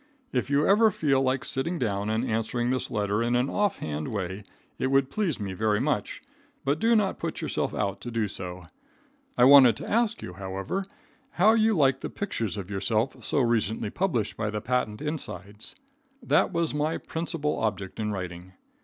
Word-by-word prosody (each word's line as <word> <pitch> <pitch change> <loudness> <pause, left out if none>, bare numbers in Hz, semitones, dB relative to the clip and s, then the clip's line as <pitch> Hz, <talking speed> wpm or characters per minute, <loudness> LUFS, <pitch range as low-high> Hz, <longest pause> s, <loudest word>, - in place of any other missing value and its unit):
If 125 +1 0
you 145 +1 +3
ever 220 +3 +6
feel 145 -8 +1
like 130 0 0
sitting 155 +7 -1
down 105 -5 -1
and 110 +3 0
answering 120 +1 -1
this 130 - -1
letter 105 -2 0
in 120 +1 +1
an 125 +3 +1
off 205 -1 +1
hand 75 0 -4
way 95 -1 -4 0.4
it 130 - +1
would 135 0 +2
please 185 - -1
me 100 -2 -4
very 105 +2 +1
much, - - -2 0.4
but 140 +3 +1
do 230 +1 +4
not 205 -3 +1
put - - -3
yourself - - -1
out 100 -2 -2
to 120 - -5
do 115 -2 -1
so. 90 -2 -6 0.7
I 120 - +5
wanted 130 -4 +8
to - - -7
ask 230 0 +1
you, 90 - -7
however, 95 - -4 0.5
how 210 +5 +5
you 220 -1 +3
like 135 -4 +3
the - - -5
pictures 115 - -3
of 100 0 -6
yourself 110 +6 0 0.2
recently 115 -5 +1
published 160 - -1
by 105 -1 -2
the 105 0 -3
patent 115 +1 -1
insides. 110 - -5 0.5
That - - +3
was 170 -3 0
my 150 +2 0
principal 160 -2 -3
object 100 -3 -3
in 105 -1 -1
writing. 90 -1 -6
120 Hz, 180 wpm, -27 LUFS, 105-150 Hz, 0.7 s, wanted